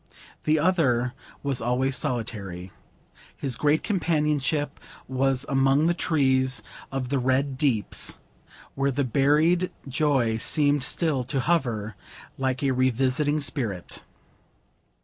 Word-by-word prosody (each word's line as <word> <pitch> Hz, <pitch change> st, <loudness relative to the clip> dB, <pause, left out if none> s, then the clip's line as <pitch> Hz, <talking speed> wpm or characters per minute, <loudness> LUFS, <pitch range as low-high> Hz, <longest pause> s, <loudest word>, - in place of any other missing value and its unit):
The 155 Hz, +1 st, +3 dB
other 140 Hz, -8 st, +2 dB, 0.3 s
was 140 Hz, -3 st, -1 dB
always 125 Hz, +3 st, 0 dB
solitary. 100 Hz, -8 st, -3 dB, 0.7 s
His 135 Hz, -4 st, -2 dB
great 150 Hz, +4 st, +2 dB
companionship 150 Hz, -6 st, 0 dB, 0.3 s
was 130 Hz, 0 st, +1 dB
among 135 Hz, +2 st, +3 dB
the 170 Hz, -, +3 dB
trees 130 Hz, -6 st, +1 dB, 0.3 s
of 135 Hz, -2 st, -3 dB
the 140 Hz, 0 st, +1 dB
Red 130 Hz, +2 st, +1 dB
Deeps, 130 Hz, -, +1 dB, 0.6 s
where 135 Hz, 0 st, 0 dB
the 140 Hz, +1 st, 0 dB
buried 150 Hz, +8 st, +2 dB, 0.2 s
joy 135 Hz, -5 st, +1 dB
seemed 145 Hz, +4 st, +2 dB
still 145 Hz, -1 st, 0 dB
to 135 Hz, +1 st, 0 dB
hover, 120 Hz, -, 0 dB, 0.4 s
like 130 Hz, 0 st, -1 dB
a 135 Hz, -, +2 dB
revisiting 130 Hz, +4 st, +1 dB
spirit. 115 Hz, -, -3 dB
135 Hz, 110 wpm, -25 LUFS, 125-150 Hz, 0.7 s, The